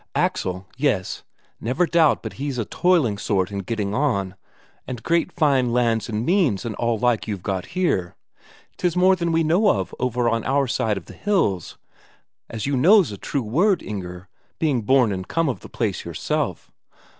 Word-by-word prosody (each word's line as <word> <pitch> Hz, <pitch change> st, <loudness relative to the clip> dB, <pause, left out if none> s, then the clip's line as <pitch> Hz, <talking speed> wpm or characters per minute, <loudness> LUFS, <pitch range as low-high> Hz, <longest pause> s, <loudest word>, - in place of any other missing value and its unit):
Axel, 95 Hz, +1 st, -1 dB
yes, 130 Hz, -10 st, 0 dB, 0.4 s
never 130 Hz, +10 st, +1 dB
doubt 165 Hz, -3 st, +3 dB
but -, -, -5 dB
he's 140 Hz, -3 st, -2 dB
a 115 Hz, -, -1 dB
toiling 160 Hz, -, +2 dB
sort 95 Hz, -2 st, 0 dB
and 100 Hz, -1 st, -4 dB
getting 105 Hz, -2 st, -2 dB
on, 105 Hz, -8 st, 0 dB, 0.5 s
and 125 Hz, -3 st, -6 dB
great 170 Hz, 0 st, +1 dB
fine 135 Hz, -5 st, +2 dB
lands 115 Hz, -2 st, +1 dB
and 110 Hz, +1 st, -2 dB
means 160 Hz, -, +2 dB
and 115 Hz, -, -3 dB
all 115 Hz, -1 st, 0 dB
like 120 Hz, 0 st, +1 dB
you've 100 Hz, -4 st, -4 dB
got 95 Hz, -2 st, -3 dB
here 95 Hz, -, 0 dB, 0.6 s
'tis 180 Hz, -2 st, 0 dB
more 185 Hz, +1 st, +5 dB
than 170 Hz, -2 st, -1 dB
we 165 Hz, 0 st, +2 dB
know 175 Hz, +7 st, +3 dB
of 95 Hz, -2 st, 0 dB
over 125 Hz, -1 st, 0 dB
on 115 Hz, -1 st, +1 dB
our 140 Hz, +2 st, +1 dB
side 115 Hz, -4 st, 0 dB
the -, -, -12 dB
hills, 165 Hz, -, -1 dB, 0.7 s
as 115 Hz, -2 st, -4 dB
you 140 Hz, 0 st, 0 dB
know's 180 Hz, -, +5 dB
a -, -, -5 dB
true 135 Hz, +6 st, -3 dB
word, 175 Hz, -, +2 dB
Inger, 90 Hz, -3 st, -6 dB, 0.3 s
being 145 Hz, -7 st, +1 dB
born 125 Hz, 0 st, +3 dB
and 95 Hz, -1 st, -4 dB
come 165 Hz, -1 st, 0 dB
of 130 Hz, -, -2 dB
the -, -, -12 dB
place 105 Hz, -6 st, -2 dB
yourself. -, -, -3 dB
125 Hz, 180 wpm, -23 LUFS, 105-160 Hz, 0.7 s, more